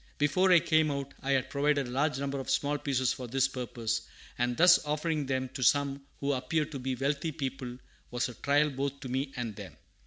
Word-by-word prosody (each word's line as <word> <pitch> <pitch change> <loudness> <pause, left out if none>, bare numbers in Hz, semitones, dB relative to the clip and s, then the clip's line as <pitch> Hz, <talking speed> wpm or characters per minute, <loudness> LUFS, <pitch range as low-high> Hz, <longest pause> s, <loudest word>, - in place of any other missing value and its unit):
Before 165 +6 +3
I 180 - +9
came 155 -1 +2
out, 140 -1 -4
I 140 +1 0
had 130 +1 0
provided 145 -1 +1
a - - -7
large 140 +1 +1
number 140 0 -2
of 135 - -6
small 145 +2 +1
pieces 130 -3 +1
for 125 -1 -7
this 135 +2 +2
purpose, 120 -3 -3 0.3
and 120 0 -1
thus 175 +1 +7
offering 150 -1 -1
them 130 -1 -1
to 130 +1 -7
some 140 +1 +2 0.2
who 140 0 +1
appeared 150 +4 -1
to 140 - -5
be 130 0 -2
wealthy 140 +4 -1
people 130 -3 -5 0.3
was 120 0 -1
a 125 - -8
trial 145 +5 +2
both 140 +1 -3
to 130 - -6
me 135 +2 -2
and 120 -4 -4
them. - - -10
140 Hz, 215 wpm, -30 LUFS, 130-145 Hz, 0.3 s, I